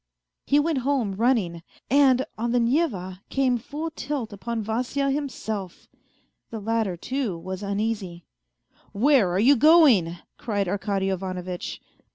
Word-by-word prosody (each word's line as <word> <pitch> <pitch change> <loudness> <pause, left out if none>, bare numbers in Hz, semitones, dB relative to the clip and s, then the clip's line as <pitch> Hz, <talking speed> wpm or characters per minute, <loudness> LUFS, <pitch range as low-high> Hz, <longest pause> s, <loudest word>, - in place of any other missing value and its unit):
He 285 - +4
went 305 -2 +1
home 255 -6 0
running, 200 -6 +1 0.3
and 265 -1 +4
on 235 +2 -2
the 245 - +3
Neva 230 - 0
came 255 -3 +1
full 300 +6 -5
tilt 275 -8 -4
upon 225 +2 -4
Vasya 255 +6 -1
himself. 220 - -4 0.6
The 225 - -6
latter, 220 -3 -1
too, 255 -3 -3
was 185 +3 -6
uneasy. 200 -4 -3 0.3
" - - -53 0.3
Where 245 -2 +4
are 175 - -1
you 265 +7 +6
going 295 - +6
1 170 +1 -8
" - - -53
cried 205 -4 -1
Arkady 195 0 -1
Ivanovitch. 185 -1 -4
225 Hz, 145 wpm, -25 LUFS, 190-270 Hz, 0.6 s, you